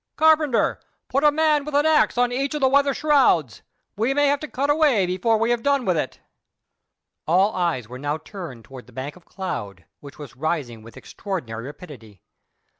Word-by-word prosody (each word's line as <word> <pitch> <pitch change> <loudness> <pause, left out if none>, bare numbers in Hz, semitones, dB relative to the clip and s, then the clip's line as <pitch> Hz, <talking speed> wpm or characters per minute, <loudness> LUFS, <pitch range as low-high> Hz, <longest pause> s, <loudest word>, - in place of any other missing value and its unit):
Carpenter, 310 -5 +3 0.3
put 275 +2 0
a 300 - +6
man 305 -1 +2
with 300 0 -5
an 290 +1 +3
axe 315 -5 +3
at 245 0 +2
each 275 +3 -2
of 300 - -3
the 265 - +5
weather 280 +1 +3
shrouds. 260 - +2 0.3
We 230 +6 0
may 290 0 +3
have 285 0 +1
to 305 - -6
cut 280 +1 0
away 290 -10 +3
before 185 +5 +1
we 225 +2 +1
have 240 -1 0
done 280 -1 +1
with 180 - +1
it." 150 -4 -3 1.1
All 190 +6 +3
eyes 170 -11 -1
were 125 +2 -9
now 145 +2 -2
turned 160 - -10
towards 130 -2 -12
the - - -18
bank 135 +3 -6
of 180 - -19
cloud, 100 - -6
which 140 -1 -13
was 145 -3 -10
rising 135 -6 -3
with 115 +1 -14
extraordinary 125 - -6
rapidity. 130 - -12
195 Hz, 190 wpm, -23 LUFS, -, 1.1 s, a